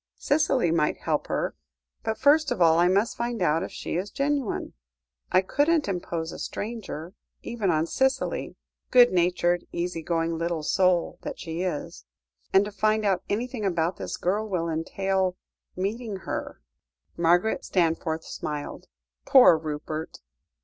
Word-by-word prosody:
Cicely 275 - +2
might 155 -2 +1
help - - -1
her, - - -2 0.5
but, 220 0 -2
first 290 +2 +4
of - - -2
all, 165 -1 +5
I 175 - +5
must 200 +5 +2
find 235 -1 -3
out 165 -3 +2
if - - -5
she - - -4
is 190 +3 -3
genuine. 280 -2 -1 0.6
I 185 - +5
couldn't 295 - +2
impose 170 -3 -3
a - - -8
stranger, 200 -7 -5 0.3
even 225 -5 -2
on 160 -1 +2
Cicely, 265 +9 -1 0.3
good 245 -1 +7
natured, 175 0 +1
easy 175 -1 -3
going 165 0 -1
little 170 -2 -2
soul 180 +1 +2
that - - -6
she 165 0 -4
is. 165 - -4 0.5
And 195 +1 +5
to 210 - -6
find 215 +1 +1
out 190 -3 +2
anything 235 +2 -2
about 175 -2 0
this - - -5
girl 210 +4 -1
will 175 -4 -1
entail 185 +3 -1 0.4
meeting 210 +3 -3
her!" - - -5 0.5
Margaret 175 +5 +2
Stanforth 165 -2 0
smiled. 150 -1 -6 0.4
"Poor 255 - +8
Rupert!" 155 0 -5
185 Hz, 145 wpm, -26 LUFS, 165-220 Hz, 0.6 s, Poor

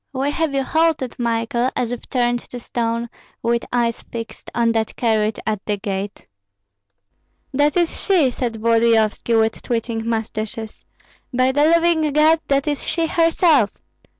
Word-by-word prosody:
Why 270 +2 0
have 300 -1 -1
you 270 - +1
halted, 315 -4 +1
Michael, 235 +1 0
as 245 -2 -1
if 245 - -6
turned 240 -1 +1
to 245 - -7
stone, 235 0 -2 0.4
with 235 0 +1
eyes 235 -2 0
fixed 230 -1 -8
on 235 -1 +2
that 225 -1 -1
carriage 220 -2 +1
at 215 -2 -2
the 210 -1 0
gate?" 195 0 -5 1.3
"That 290 +4 +2
is 345 -2 0
she!" 340 -10 +3
said 240 -2 -3
Volodyovski, 230 0 +2
with 220 0 0
twitching 230 -1 -2
mustaches. 220 0 -4 0.5
"By 255 +1 +2
the 290 +2 +3
living 330 -2 +3
God, 310 +2 +5
that 275 +1 +1
is 290 -2 -1
she 335 -1 0
herself!" 325 - +3
240 Hz, 150 wpm, -20 LUFS, 225-290 Hz, 1.3 s, God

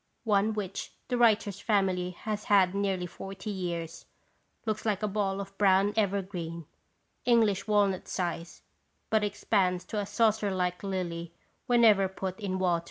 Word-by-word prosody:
One 215 -1 +2
which 200 -2 -4 0.2
the 250 - 0
writer's 215 -4 +3
family 190 -4 +1
has 210 +3 -5
had 190 -3 +4
nearly 195 -2 -1
forty 195 +3 -7
years, 170 -3 -4 0.6
looks 215 -1 -2
like 215 -2 -1
a - - +2
ball 200 -1 -1
of 195 0 -7
brown 195 0 +4
evergreen, 185 -5 -2 0.6
English 225 -5 +3
walnut 200 -3 +2
size, 170 -2 -4 0.5
but 220 -1 +3
expands 190 -3 0
to 215 - -3
a 200 - -3
saucer 220 -2 +2
like 180 -1 -1
lily 170 -4 -4 0.3
whenever 225 -6 +5
put 190 0 -5
in 190 -3 -2
water. 180 -2 +2
195 Hz, 145 wpm, -29 LUFS, 185-210 Hz, 0.6 s, whenever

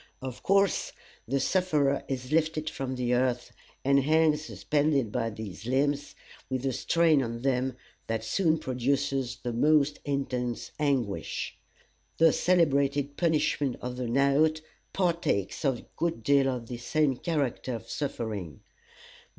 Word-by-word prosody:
Of 130 -2 -7
course, 195 -1 +2 0.3
the 135 +3 0
sufferer 150 -4 +1
is 130 0 -4
lifted 155 -1 +1
from 130 -1 -4
the 125 -1 0
earth, 125 -1 0 0.3
and 140 0 +5
hangs 155 +1 +3
suspended 145 -7 0
by 115 - -1
his 110 -1 -8
limbs, 145 +2 0 0.3
with 130 0 -2
a 135 - 0
strain 165 +1 +3
on 115 -1 -4
them 130 -1 0 0.3
that 110 0 -2
soon 160 - +2
produces 130 -1 -1
the 120 -2 -2
most 150 +3 +3
intense 125 -4 -2
anguish. 135 -9 -1 0.6
The 165 -1 +5
celebrated 140 -5 +2
punishment 155 -5 +1
of 125 0 -5
the 125 -1 -3
"knout" 140 +5 +3 0.3
partakes 170 - 0
a 135 -4 0
good 165 -9 -2
deal 140 +1 +4
of 125 -3 -3
this 120 0 -7
same 150 -2 +1
character 140 -6 -2
of 115 - -8
suffering. 105 - -4
135 Hz, 135 wpm, -28 LUFS, 125-155 Hz, 0.6 s, and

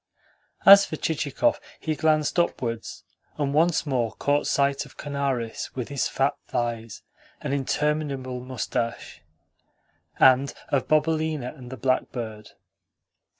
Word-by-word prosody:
As 200 0 +10
for - - -4
Chichikov, 160 - 0 0.2
he 160 - -2
glanced 155 +2 +2
upwards, 115 -9 -2 0.3
and 140 -2 -1
once 165 +2 +3
more 125 -6 0
caught 145 +1 0
sight 140 0 +1
of - - -16
Kanaris 135 -5 -3
with 125 -3 -4
his 140 -2 0
fat 135 +2 +1
thighs 115 -2 -3 0.4
and - - -3
interminable 140 -2 -1
moustache, 125 -2 -4 1.0
and 130 +1 +5
of 140 -2 0
Bobelina 155 -3 0
and 125 -2 -11
the 130 - -6
blackbird. 115 -3 -2
140 Hz, 115 wpm, -25 LUFS, 125-150 Hz, 1.0 s, As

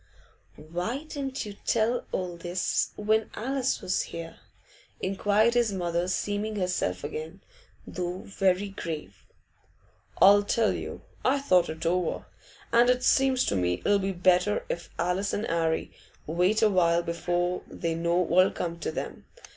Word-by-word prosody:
'Why 175 - -4
didn't 275 -5 -4
you 205 - -7
tell 230 +4 0
all 180 -2 -3
this 175 +2 -1
when 215 +1 +1
Alice 265 +2 -1
was 185 - 0
here?' 165 0 -7 0.6
inquired 205 +4 +2
his 240 -3 +2
mother, 175 -2 -1
seeming 205 +3 -2
herself 180 - -1
again, 155 +5 -6 0.4
though 180 0 -4
very 195 0 +1
grave. 155 - -7 0.9
'I'll 205 +1 +8
tell 220 +2 +1
you. - - -6 0.2
I 265 +2 +3
thought 185 -11 +3
it 160 +1 -6
over, 175 0 0 0.5
and 240 +1 +5
it 250 0 +2
seems 265 -1 +3
to - - 0
me 90 -1 0
it'll 205 0 +4
be 195 0 -1
better 180 +2 +2
if 170 - -4
Alice 180 +4 0
and 210 - -1
'Arry 165 -3 0 0.3
wait 180 +7 +2
a 215 - +6
while 170 -2 +3
before 175 +1 -1
they 165 -1 -3
know 170 +1 0
what'll 180 +1 +4
come 170 -1 -4
to 160 - -3
them. - - -6
185 Hz, 145 wpm, -27 LUFS, 170-215 Hz, 0.9 s, I'll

